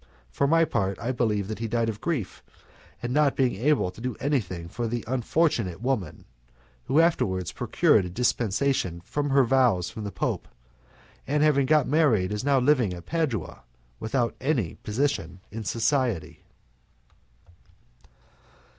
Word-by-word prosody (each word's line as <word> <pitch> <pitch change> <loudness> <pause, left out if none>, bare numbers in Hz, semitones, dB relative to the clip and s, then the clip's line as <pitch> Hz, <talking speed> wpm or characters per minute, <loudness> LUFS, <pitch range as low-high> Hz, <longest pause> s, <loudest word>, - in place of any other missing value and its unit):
For 140 - +1
my 165 +2 +4
part, 100 -10 -1
I 120 +2 -2
believe 105 -5 0
that 110 0 -5
he 115 - -2
died 115 +1 0
of 110 -2 -4
grief 150 - -3 0.6
at 120 - -2
not 145 0 +3
being 130 -3 +2
able 120 -3 +1
to 100 - -13
do 125 0 -3
anything 95 - -2
for 115 +7 -3
the 120 0 -3
unfortunate 125 - 0
woman, 125 -5 -2 0.6
who 145 - +2
afterwards 95 - +1
procured 95 - +2
a - - -5
dispensation 110 -3 0
from 145 +10 -3
her 135 0 +5
vows 120 -8 +2
from 110 - -7
the 100 - -4
Pope, - - -2 0.8
and 150 +2 +2
having 140 -3 +3
got 150 -2 +3
married 125 - +2
is 105 - -3
now 140 0 +3
living 125 -8 +2
at 85 -1 -11
Padua 150 - -2 0.4
without 120 +1 -1
any 125 - 0
position 105 - -2
in 110 +1 -5
society. 110 - -1
120 Hz, 145 wpm, -26 LUFS, 100-140 Hz, 0.8 s, her